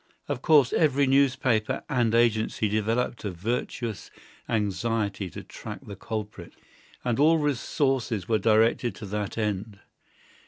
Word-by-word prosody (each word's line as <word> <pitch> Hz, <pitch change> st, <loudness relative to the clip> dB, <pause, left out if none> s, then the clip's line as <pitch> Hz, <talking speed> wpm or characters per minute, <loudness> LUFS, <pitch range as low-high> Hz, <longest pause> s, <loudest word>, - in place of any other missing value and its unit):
Of 125 Hz, -, -3 dB
course 145 Hz, -6 st, +5 dB
every 140 Hz, -3 st, +3 dB
newspaper 130 Hz, -4 st, +2 dB
and 120 Hz, -5 st, +1 dB
agency 110 Hz, -2 st, +2 dB
developed 110 Hz, +4 st, -1 dB
a 105 Hz, -, -2 dB
virtuous 110 Hz, +2 st, -4 dB, 0.4 s
anxiety 105 Hz, -2 st, -1 dB
to -, -, -9 dB
track -, -, -9 dB
the 100 Hz, -, -8 dB
culprit, 105 Hz, -4 st, -6 dB, 0.5 s
and 120 Hz, 0 st, 0 dB
all 160 Hz, +3 st, +5 dB
resources 135 Hz, -, 0 dB
were 110 Hz, -2 st, +2 dB
directed 110 Hz, +1 st, +2 dB
to 105 Hz, -, -8 dB
that 105 Hz, +1 st, -4 dB
end. 105 Hz, -1 st, -2 dB
115 Hz, 125 wpm, -26 LUFS, 105-125 Hz, 0.5 s, course